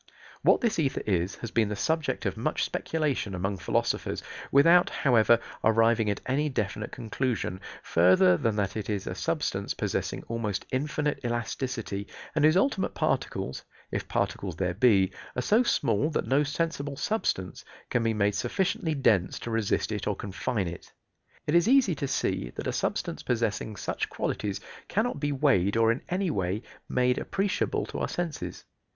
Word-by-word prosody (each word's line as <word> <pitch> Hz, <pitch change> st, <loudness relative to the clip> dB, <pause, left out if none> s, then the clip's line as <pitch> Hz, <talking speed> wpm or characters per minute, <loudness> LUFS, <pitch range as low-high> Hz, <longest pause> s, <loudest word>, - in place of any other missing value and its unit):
What -, -, +4 dB
this 230 Hz, -8 st, +1 dB
ether 140 Hz, -4 st, 0 dB
is, 95 Hz, -2 st, 0 dB
has 115 Hz, -, -7 dB
been 110 Hz, -3 st, +2 dB
the 105 Hz, -, -2 dB
subject 160 Hz, +8 st, -1 dB
of -, -, 0 dB
much -, -, -1 dB
speculation 145 Hz, -11 st, -1 dB
among 95 Hz, +2 st, -2 dB
philosophers, -, -, -1 dB, 0.3 s
without, 170 Hz, +6 st, +6 dB
however, 120 Hz, -3 st, +4 dB, 0.2 s
arriving 115 Hz, 0 st, +4 dB
at 100 Hz, -, -2 dB
any 145 Hz, +4 st, +1 dB
definite 105 Hz, -4 st, -3 dB
conclusion, 115 Hz, -5 st, -2 dB, 0.2 s
further 90 Hz, +1 st, +5 dB
than 110 Hz, +4 st, 0 dB
that 100 Hz, -2 st, -1 dB
it 110 Hz, -1 st, -4 dB
is 100 Hz, -2 st, -2 dB
a -, -, -3 dB
substance -, -, -2 dB
possessing -, -, -2 dB
almost 110 Hz, -4 st, -2 dB
infinite 150 Hz, +1 st, -1 dB
elasticity, 120 Hz, -3 st, -3 dB, 0.3 s
and 150 Hz, -, +1 dB
whose 155 Hz, +3 st, +6 dB
ultimate 195 Hz, -2 st, +1 dB
particles, 65 Hz, -, -1 dB, 0.3 s
if -, -, -3 dB
particles 95 Hz, -4 st, -2 dB
there 90 Hz, 0 st, -1 dB
be, 100 Hz, -2 st, +4 dB, 0.2 s
are 125 Hz, -, 0 dB
so 220 Hz, +3 st, +4 dB
small 145 Hz, -, +1 dB
that 155 Hz, -, -1 dB
no 135 Hz, +2 st, +3 dB
sensible 145 Hz, -1 st, -2 dB
substance 115 Hz, -, -1 dB, 0.3 s
can 120 Hz, -, +2 dB
be 115 Hz, -1 st, +1 dB
made 105 Hz, 0 st, +2 dB
sufficiently 170 Hz, -, 0 dB
dense 105 Hz, -9 st, +2 dB
to 120 Hz, -, -5 dB
resist 110 Hz, -1 st, 0 dB
it 105 Hz, -2 st, -3 dB
or 105 Hz, -, +1 dB
confine 100 Hz, +1 st, -2 dB
it. 85 Hz, 0 st, -8 dB, 0.5 s
It 150 Hz, -, 0 dB
is 170 Hz, +2 st, +5 dB
easy 255 Hz, -7 st, +5 dB
to 140 Hz, -2 st, -3 dB
see 60 Hz, -, -1 dB
that -, -, -5 dB
a -, -, -1 dB
substance -, -, -2 dB
possessing 110 Hz, -2 st, -1 dB
such -, -, -3 dB
qualities 100 Hz, -2 st, -2 dB, 0.3 s
cannot 215 Hz, -5 st, 0 dB
be 145 Hz, 0 st, 0 dB
weighed 130 Hz, -9 st, +2 dB
or 115 Hz, 0 st, +5 dB
in 115 Hz, -, -2 dB
any 185 Hz, -1 st, 0 dB
way 95 Hz, 0 st, -1 dB, 0.3 s
made 125 Hz, 0 st, +2 dB
appreciable 195 Hz, 0 st, -1 dB
to -, -, -6 dB
our -, -, -1 dB
senses. 170 Hz, -4 st, -4 dB
115 Hz, 165 wpm, -28 LUFS, 100-150 Hz, 0.5 s, without